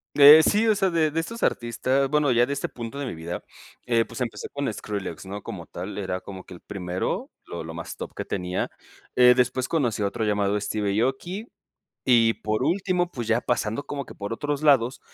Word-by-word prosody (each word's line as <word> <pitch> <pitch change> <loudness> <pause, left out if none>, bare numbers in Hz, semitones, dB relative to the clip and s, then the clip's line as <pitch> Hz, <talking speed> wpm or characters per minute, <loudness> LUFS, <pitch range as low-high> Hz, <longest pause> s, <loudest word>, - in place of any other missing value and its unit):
Eh, 145 +2 +10
sí, 215 +6 +3
o 220 - +5
sea, 195 -1 +2
de 160 -2 +2
de 160 +2 0
estos 230 +8 -6
artistas, 130 +3 +1
bueno, 150 -1 +2
ya 120 0 +4
de 140 - -3
este 140 - -3
punto 120 +3 -7
de 140 - -3
mi - - -4
vida, 85 +2 -6 0.4
eh, 115 -2 +3
pues - - -9
empecé 120 - -4
con 140 -4 -2
Skrillex, 100 -2 -5
¿no? 100 +1 -6
Como 85 -4 -7
tal, 95 +5 -6
era 95 -2 -2
como 95 -1 -9
que 90 - -11
el - - -12
primero, 90 -2 -3 0.2
lo - - -6
lo - - -8
más - - -6
top - - -7
que - - -4
tenía. 90 -1 -2 0.5
Eh, 125 0 +8
después 125 +1 +1
conocí 125 -10 0
a 100 - +2
otro 110 +2 -2
llamado 105 -1 +1
Steve 100 0 -1
Aoki, 175 - -2 0.6
y 115 -3 +5
por 110 +3 -2
último, 175 +2 +1
pues 120 -8 -5
ya 115 +1 +3
pasando 120 +2 -1
como 140 -2 -5
que - - -11
por 100 +2 -5
otros 145 +4 -2
lados, 135 -4 +4
120 Hz, 215 wpm, -25 LUFS, 105-145 Hz, 0.6 s, Eh